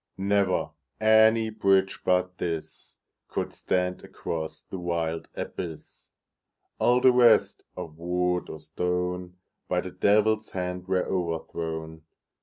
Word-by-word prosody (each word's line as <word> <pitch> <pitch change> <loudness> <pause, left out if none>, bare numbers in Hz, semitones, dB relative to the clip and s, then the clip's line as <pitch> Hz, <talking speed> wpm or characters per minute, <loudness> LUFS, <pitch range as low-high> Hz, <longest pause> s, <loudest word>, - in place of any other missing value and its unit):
Never 100 -3 +1 0.3
any 110 +1 +5
bridge 95 -3 +2
but 90 0 +1
thisCould 80 -2 -6
stand 90 0 -1
across 80 -1 -5
the 95 - -7
wild 85 -2 -2
abyss; 80 -3 -7 0.7
All 125 +1 +4
the 130 - +7
rest, 120 -2 +4
of 80 -1 -7
wood 90 +1 0
or 80 - -7
stone, 90 +3 -3 0.3
By - - +1
the - - -7
Devil's 110 +1 +2
hand 90 0 -4
were 95 -1 +1
overthrown. 80 -2 -3
90 Hz, 110 wpm, -27 LUFS, 85-100 Hz, 0.7 s, the